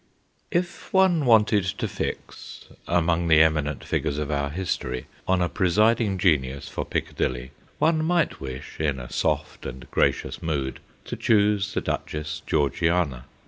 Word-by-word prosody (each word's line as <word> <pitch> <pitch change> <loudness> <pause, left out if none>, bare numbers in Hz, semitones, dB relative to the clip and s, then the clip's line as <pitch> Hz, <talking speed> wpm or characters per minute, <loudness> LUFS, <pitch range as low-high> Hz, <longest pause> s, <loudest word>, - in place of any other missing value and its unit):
IF 175 -1 -2
one 185 -6 +4
wanted 105 -3 +5
to 100 +4 -2
fix, - - -6 0.2
among 85 0 +1
the 80 -2 +6
eminent 75 -2 0
figures 70 - -1
of 75 0 -2
our 70 -1 0
history, 70 -7 -3 0.2
on 95 -1 +2
a - - +2
presiding 105 +3 +2
genius 70 -7 +1
for - - -4
Piccadilly, 65 +1 -2 0.3
one 155 0 +2
might 170 -1 +1
wish, 65 -1 -7
in 75 -4 0
a - - -9
soft - - -1
and 65 0 -7
gracious - - 0
mood, 70 -5 -2 0.3
to - - -5
choose 105 -2 +2
the - - +1
Duchess 75 0 -4
Georgiana. 75 -2 +1
85 Hz, 145 wpm, -25 LUFS, 70-105 Hz, 0.3 s, the